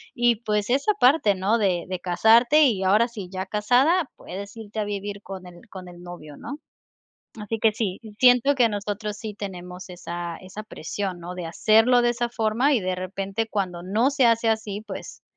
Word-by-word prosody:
Y, 240 -2 +3
pues, 210 -1 -1
esa 280 +11 +2
parte, 250 -7 +4
¿no? 205 +5 +1
De 180 -4 +1
de 185 -1 -4
casarte, 230 - +4
y 210 -8 +2
ahora 210 +5 +4
sí 205 -6 -8
ya 190 0 -4
casada, 250 - +2
puedes 200 +3 -8
irte 220 0 -7
a 210 - 0
vivir, 205 0 -5
con 190 -2 -9
el 175 -1 -13
con 185 -2 -9
el 175 0 -12
novio, 175 -5 -10
¿no? 285 - -7 0.8
Así 215 +2 -4
que 220 0 +3
sí, 205 -2 -3 0.2
siento 250 +2 +5
que 240 -4 +3
nosotros 210 +1 -4
sí 215 -2 -6
tenemos, 180 -2 -8
esa 175 -1 -6
esa 190 +3 -9
presión, 190 -1 -5
¿no? 175 +2 -7
De 180 -2 -6
hacerlo 225 +8 +4
de 240 - +2
esa 240 0 -2
forma, 235 +5 +1
y 240 - +2
de 185 0 -1
repente, 195 +4 -3
cuando 180 -4 -2
no 220 +9 +1
se 275 -3 +2
hace 230 0 +3
así, 215 -2 -1
pues 195 - -8
210 Hz, 190 wpm, -24 LUFS, 185-230 Hz, 0.8 s, siento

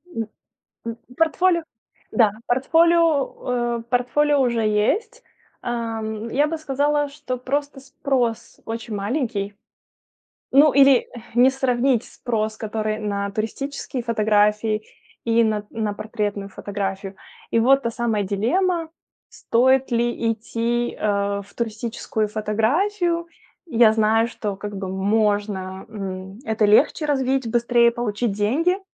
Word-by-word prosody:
н 225 -1 -2 0.6
м 230 0 -4 0.2
портфолио, 340 +2 +2 0.5
да, 215 -2 +4
портфолио, 275 -4 +2
э, - - -7
портфолио 280 +4 +2
уже 235 -3 +1
есть. 215 - 0 0.4
Ам, 225 -2 -3
я 290 +5 +2
бы 325 +2 -2
сказала, 290 0 0
что 280 -3 -5
просто 280 +2 -3
спрос 265 -4 -2
очень 225 -1 -5
маленький. 205 -2 -2 1.0
Ну, 285 +2 +6
или 275 -2 +5 0.3
не 250 +2 +6
сравнить 255 -2 +1
спрос, 215 -3 -3
который 215 0 -3
на 200 -1 -2
туристические 255 +5 -4
фотографии 215 -1 +2 0.4
и 230 0 +3
на 215 -1 0
на 215 -2 -2
портретную 210 -2 -3
фотографию. 195 -1 -5 0.3
И - - +2
вот 270 +4 +4
та 235 - -1
самая 225 -3 -1
дилемма: 325 - 0 0.4
стоит 260 +2 +2
ли 235 -1 +1
идти, 235 +2 -2
э, 200 -1 0
в 200 - -19
туристическую 220 -1 -2
фотографию. 335 - 0 0.4
Я 235 -7 +5
знаю, 220 +1 +3
что 210 -4 -4
как 205 0 -6
бы 190 -1 -4
можно, 200 -1 0
м, 190 -2 -6
это 220 -1 +1
легче 215 +8 +4
развить, 265 -4 0
быстрее 235 0 +4
получить 235 -1 -2
деньги. 320 - +1
230 Hz, 120 wpm, -22 LUFS, 210-270 Hz, 1.0 s, Ну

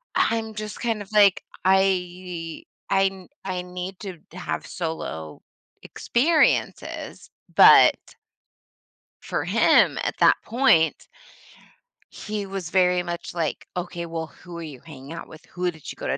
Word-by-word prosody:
I’m 225 -1 +1
just 215 -1 -6
kind 230 -4 -1
of 205 - -11
like, 205 -3 +5 0.2
I 180 -3 0 0.3
I 195 0 +3
n 190 -2 -4 0.2
I 185 -2 -3
need 180 +1 -7
to 190 -4 -7 0.2
have 185 - -4
solo 120 - -5 0.4
experiences, 310 +7 0 0.2
but - - +8 1.3
for - - -3
him, - - +4
at - - -2
that - - +4
point 215 -10 +2 1.0
he 210 -1 -5
was 195 -4 -5
very 180 -1 +3
much, 175 -1 -6
like, 165 -4 -3
"Okay, 175 -1 -4
well, 165 -1 -4
who 175 +1 -12
are - - -6
you 145 -5 -9
hanging 145 -2 -11
out 165 - -8
with? 155 - -14
Who 180 0 -2
did 160 -3 -10
you - - -10
go - - -6
to" - - 0
180 Hz, 140 wpm, -24 LUFS, 165-195 Hz, 1.3 s, but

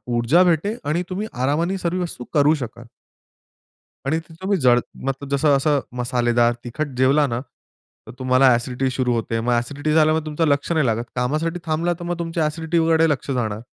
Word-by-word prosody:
ऊर्जा 125 +10 +4
भेटे 180 +5 +1
आणि 165 +4 -1
तुम्ही 195 +4 -3
आरामाने 150 +9 0
सर्व 180 0 -2
वस्तू 165 -8 -5
करू 150 0 +4
शकाल. 120 -4 -7 1.2
आणि 155 +4 +1
जर 165 0 -15
तुम्ही 195 +1 +1
जड 125 -1 +5 0.3
मतलब 135 +1 -3
जसं 140 +1 +3
असं 145 +1 +2 0.2
मसालेदार 120 -1 +2
तिखट 145 +6 -3
जेवला 135 +3 +4
ना 120 -1 -2 0.7
तर - - -8
तुम्हाला 130 +1 +4
ॲसिडिटी 125 +2 -1
सुरू 125 -1 0
होते. 115 0 -1
मग 120 +2 -1
ॲसिडिटी 145 +6 -1
झाल्यामुळे 155 0 +3
तुमचं 155 +1 0
लक्ष 140 +2 0
नाही 155 -4 +2
लागत. 115 -1 0
कामासाठी 155 +8 -1
थांबला 165 +2 0
तर - - -7
मग 175 0 -3
तुमच्या 165 -1 -1
ॲसिडिटीकडे 165 +1 +2
लक्ष 145 -1 -2
जाणार. 110 -5 -2
145 Hz, 175 wpm, -21 LUFS, 125-165 Hz, 1.2 s, जड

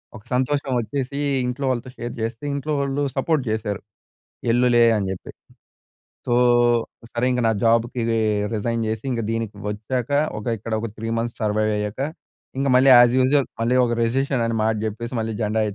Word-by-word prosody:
ఒక 110 - -11
సంతోషం 135 +2 0
వచ్చేసి 130 +4 -3 0.3
ఇంట్లో 125 +3 -3
వాళ్ళతో 130 0 -2
షేర్ 120 0 -5
చేస్తే 115 +3 -4
ఇంట్లో 140 +2 -2
వాళ్ళు 140 +1 -1
సపోర్ట్ 145 +1 +1
చేశారు. 105 -2 -2 0.7
ఎల్లులే 120 -1 +4
అని 100 -2 -1
చెప్పి. 95 - -8 1.0
సో, 120 - 0 0.8
సరే 120 +1 -1
ఇంక 125 0 0
నా - - +4
జాబ్‌కి 115 +1 +2 0.5
రిజైన్ 115 +2 -1
చేసి 110 +2 -3
ఇంక 120 -2 -1
దీనికి 115 -2 -3
వచ్చాక 110 +4 -3 0.3
ఒక 105 - -10
ఇక్కడ 110 +2 -6
ఒక 115 - -3
3 115 +1 -4
మంత్స్ 120 +1 -4
సర్వైవ్‌ 110 0 +1
అయ్యాక 105 +4 -3 0.6
ఇంక 135 +1 0
మళ్ళీ 130 +2 +6
యాజ్ 120 0 +6
యూజువల్ 135 +1 +3
మళ్ళీ 120 +2 +2
ఒక 120 - 0
రిసిషన్ 130 +1 0
అనే 115 - -1
మాట 110 0 +2
చెప్పేసి 115 +3 -5
మళ్ళీ 110 0 -2
జెండా 110 +1 +1
120 Hz, 165 wpm, -22 LUFS, 110-130 Hz, 1.0 s, మళ్ళీ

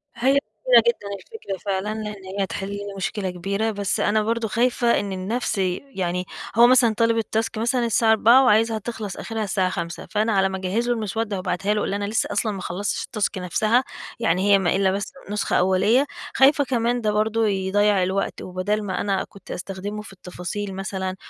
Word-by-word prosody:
هي 245 +3 +2 0.4
جميلة - - +8
جدًا 475 - 0
الفكرة 315 - -7
فعلًا، 200 +1 -1
لأن 210 -2 -7
هي 195 +1 -2
هتحل 195 0 -4
لي 200 0 -5 0.2
مشكلة 195 0 -2
كبيرة، 200 +5 -2
بس 200 -2 -1
أنا 215 +1 +2
برضو 230 +1 -1
خايفة 235 +2 +2
إن 200 -1 -4
النفس 210 +5 -2 0.4
يعني 180 -1 -1 0.3
هو 235 +1 +7
مثلًا 245 -3 +5
طالب 230 +1 +2
الtask 220 +1 -2
مثلًا 240 +2 +1
الساعة 225 0 +3
16:00 230 +4 +6
وعايزها 225 -1 +3
تخلص 215 -2 -6
آخرها 225 -1 -4
الساعة 190 -2 0
17:00، 170 -1 -5
فأنا 215 +2 +1
على 195 -1 +3
ما 190 - -4
أجهز 190 +6 -1
له 245 - +3
المسودة 220 -1 -2
وأبعتها 185 +2 -1
له، 210 - 0
وأقول - - -2
له - - -1
أنا 205 - -2
لسه 215 +2 0
أصلًا 210 +2 0
ما 195 -2 -6
خلصتش 195 +3 -2
الtask 215 -4 -2
نفسها، 215 +7 +2 0.4
يعني 190 -1 +2
هي 200 - +8
ما 175 -2 +1
إلا 190 -1 +2
بس 200 +2 -3 0.2
نسخة 210 0 -1
أولية. 190 +8 +3 0.3
خايفة 280 +2 +5
كمان 245 -2 0
ده 215 -2 +1
برضه 220 +1 +1
يضيع 200 0 +2
الوقت، 190 +2 -2
وبدال 190 +4 -2
ما 190 - -2
أنا 195 -2 0
كنت 200 - -13
أستخدمه 195 +3 -5
في 210 - -12
التفاصيل 190 +2 -6
مثلًا 190 -1 -3
205 Hz, 190 wpm, -23 LUFS, 190-225 Hz, 0.4 s, جميلة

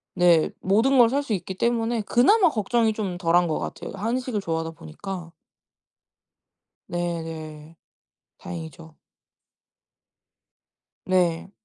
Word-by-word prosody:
네 175 -3 +4
모든 225 +8 +3
걸 235 -2 +7
살 280 +3 +1
수 235 -6 -2
있기 190 0 -4
때문에 235 +1 0
그나마 340 - +4
걱정이 225 -1 +1
좀 195 -5 -3
덜한 175 0 +3
것 155 - -1
같아요. - - -6
한식을 230 +2 -2
좋아하다 165 -2 -2
보니까. 170 - -8 1.6
네네. 165 -2 -5 0.6
다행이죠. 160 -1 -9 2.1
네. 180 -2 +1
185 Hz, 210 characters per minute, -24 LUFS, 165-230 Hz, 2.1 s, 걸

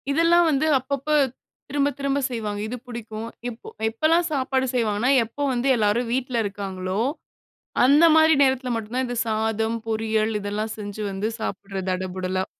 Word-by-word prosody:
இதெல்லாம் 335 +4 +4
வந்து 300 0 +2
அப்பப்ப 275 +2 -4 0.6
திரும்ப 285 +1 +1
திரும்ப 280 0 0
செய்வாங்க. 215 -4 -3
இது 245 +3 -5
புடிக்கும். 225 -2 -6 0.2
இப் 235 -2 -5 0.3
எப்பலாம் 320 +9 +2
சாப்பாடு 265 -2 0
செய்வாங்கன்னா, 230 +1 +1
எப்போ 230 +6 -9
வந்து 245 +2 -1
எல்லாரும் 225 +2 +1
வீட்ல 250 -2 0
இருக்காங்களோ! 195 -1 -4 0.8
அந்தமாரி 315 +4 +6
நேரத்தில 260 -1 +1
மட்டும் 225 +1 -5
தான் 260 - +1
இது 245 0 -4
சாதம், 220 +1 0
பொரியல் 220 0 0
இதெல்லாம் 210 +2 -3
செஞ்சு 205 0 -6
வந்து 195 +2 -2
சாப்பிடுறது 195 -2 -4
தடபுடலா. 185 0 -2
230 Hz, 140 wpm, -24 LUFS, 210-265 Hz, 0.8 s, அந்தமாரி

